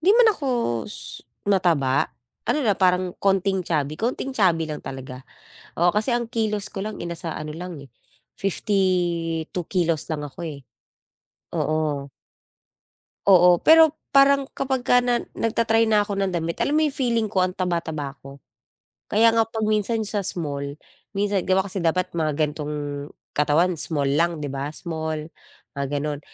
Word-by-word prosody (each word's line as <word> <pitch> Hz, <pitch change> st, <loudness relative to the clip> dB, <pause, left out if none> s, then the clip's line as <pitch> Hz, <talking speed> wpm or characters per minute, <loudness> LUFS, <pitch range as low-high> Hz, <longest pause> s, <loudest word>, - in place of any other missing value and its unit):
di 360 Hz, +5 st, +4 dB
man 480 Hz, -2 st, +7 dB
ako 280 Hz, -8 st, -4 dB, 0.4 s
s -, -, -6 dB, 0.2 s
mataba, 170 Hz, -10 st, +2 dB, 0.4 s
ano 300 Hz, -, +2 dB
lang 205 Hz, -3 st, +2 dB
parang 180 Hz, -1 st, +3 dB
konting 195 Hz, -1 st, +2 dB
chubby, 155 Hz, -3 st, -2 dB
konting 255 Hz, +3 st, -2 dB
chubby 175 Hz, -8 st, +2 dB
lang 155 Hz, -1 st, -5 dB
talaga. 130 Hz, -1 st, -7 dB, 0.6 s
Oo, 175 Hz, -, +5 dB
kasi 215 Hz, +6 st, +1 dB
ang 240 Hz, -1 st, 0 dB
kilos 215 Hz, -3 st, -1 dB
ko 195 Hz, +1 st, -5 dB
lang 215 Hz, -, -6 dB
eh, 170 Hz, -, -4 dB
nasa 170 Hz, -1 st, -5 dB
ano 155 Hz, +1 st, -6 dB
lang 175 Hz, -4 st, -7 dB
eh, 140 Hz, -, -13 dB, 0.5 s
52 180 Hz, -4 st, 0 dB
kilos 170 Hz, -4 st, +1 dB
lang 150 Hz, -, -2 dB
ako 140 Hz, +6 st, -8 dB
eh. 145 Hz, -3 st, -6 dB, 1.0 s
Oo. 150 Hz, -3 st, -1 dB, 1.2 s
Oo, 180 Hz, -2 st, +7 dB
pero 320 Hz, -1 st, +7 dB, 0.2 s
parang 275 Hz, 0 st, +6 dB
kapag 265 Hz, -2 st, -1 dB
ka 245 Hz, 0 st, +5 dB
na 245 Hz, -1 st, +2 dB, 0.2 s
nag-ta-try 225 Hz, 0 st, +2 dB
na 210 Hz, -1 st, +4 dB
ako 200 Hz, -, -3 dB
ng 195 Hz, -1 st, 0 dB
damit, 170 Hz, -1 st, -2 dB
alam 280 Hz, -, 0 dB
mo -, -, +4 dB
'yong 280 Hz, -, -5 dB
feeling 235 Hz, -5 st, +1 dB
ko 190 Hz, -3 st, +1 dB
ang 185 Hz, -, 0 dB
taba-taba 160 Hz, -6 st, -2 dB
ko. 140 Hz, 0 st, -11 dB, 0.7 s
Kaya 225 Hz, +2 st, +5 dB
nga 225 Hz, -, +5 dB
'pag 220 Hz, -1 st, -3 dB
minsan 215 Hz, +1 st, +1 dB
sa 205 Hz, -2 st, -1 dB
small, 145 Hz, -4 st, -4 dB, 0.3 s
minsan 200 Hz, -2 st, 0 dB
gawa 190 Hz, +1 st, +2 dB
kasi 185 Hz, -2 st, -4 dB
dapat 180 Hz, +2 st, 0 dB
mga 155 Hz, -2 st, +1 dB
gantong 150 Hz, 0 st, -1 dB, 0.6 s
katawan 155 Hz, +5 st, +3 dB
small 145 Hz, -3 st, -1 dB
lang 170 Hz, 0 st, +1 dB
'di 145 Hz, -, -3 dB
ba? 140 Hz, +2 st, -4 dB
Small, 160 Hz, -2 st, -4 dB, 0.5 s
mga 140 Hz, 0 st, -2 dB
gano'n. 145 Hz, -1 st, -3 dB
180 Hz, 160 wpm, -24 LUFS, 155-215 Hz, 1.2 s, man